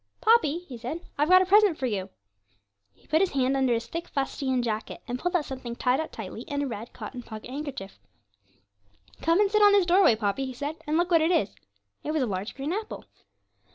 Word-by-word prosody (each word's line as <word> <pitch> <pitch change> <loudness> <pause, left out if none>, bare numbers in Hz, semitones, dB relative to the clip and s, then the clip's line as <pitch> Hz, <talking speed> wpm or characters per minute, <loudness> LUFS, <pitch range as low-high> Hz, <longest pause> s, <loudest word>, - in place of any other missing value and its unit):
'Poppy,' 355 -7 +3
he 245 -4 -8
said, 260 +9 -5 0.2
'I've 300 +2 +2
got 370 0 +7
a - - -3
present 400 -3 +5
for 265 - -2
you.' 200 -5 -2 0.8
He - - -29
put 315 +3 +2
his 390 - +1
hand 265 0 +1
under 265 -2 +2
his 230 0 -3
thick 335 +5 -5
fustian 270 -2 -1
jacket 220 -2 -3
and 245 0 -3
pulled 355 +4 -1
out 320 -4 +1
something 255 -3 -6
tied 250 +2 +1
up 315 - -4
tightly - - -7
in 285 -2 -3
a - - -2
red 225 -1 -6
cotton 250 - -8
pocket 220 +1 -9
handkerchief. 270 -8 -6 1.2
'Come 330 +3 +3
and 410 -1 +3
sit 425 0 +3
on 410 -1 +7
this 400 -3 +5
doorstep, 350 - +5
Poppy,' 215 +5 -1
he 260 - -6
said, 290 +5 -5
'and 305 +1 +1
look 350 +1 +1
what 330 -2 +5
it 320 - +2
is.' 215 - +1 0.5
It 305 - -2
was 310 -4 +1
a - - +1
large 200 0 -4
green 280 +5 -3
apple. 430 +2 -5
285 Hz, 225 wpm, -27 LUFS, 245-345 Hz, 1.2 s, got